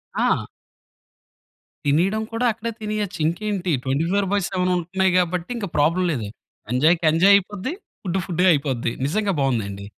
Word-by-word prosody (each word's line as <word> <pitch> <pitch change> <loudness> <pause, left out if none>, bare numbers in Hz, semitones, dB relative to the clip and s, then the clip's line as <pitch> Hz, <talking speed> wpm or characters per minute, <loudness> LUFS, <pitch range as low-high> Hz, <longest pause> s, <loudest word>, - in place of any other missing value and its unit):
ఆ! - - +1 1.4
తినేయడం 180 +10 +2
కూడా 240 +2 0
అక్కడే 230 +1 -5
తినేయచ్చు. 210 -4 -3
ఇంకేంటి 185 +1 -1
24/7 185 +5 0
ఉంటున్నయి 185 +2 0
గాబట్టి 180 +1 0
ఇంగ 200 -4 -3
ప్రాబ్లమ్ 170 +5 +2
లేదు. 115 -8 -3 0.5
ఎంజాయ్‌కి 160 +6 +3
ఎంజాయ్ 190 +5 +6
అయిపోద్ది. 205 - -4 0.3
ఫుడ్ 190 0 -1
ఫుడ్డు‌గా 180 +1 +2
అయిపోద్ది. 135 -5 -1 0.2
నిజంగా 205 +4 0
బావుందండి. 100 -7 -1
180 Hz, 120 wpm, -22 LUFS, 155-200 Hz, 1.4 s, ఎంజాయ్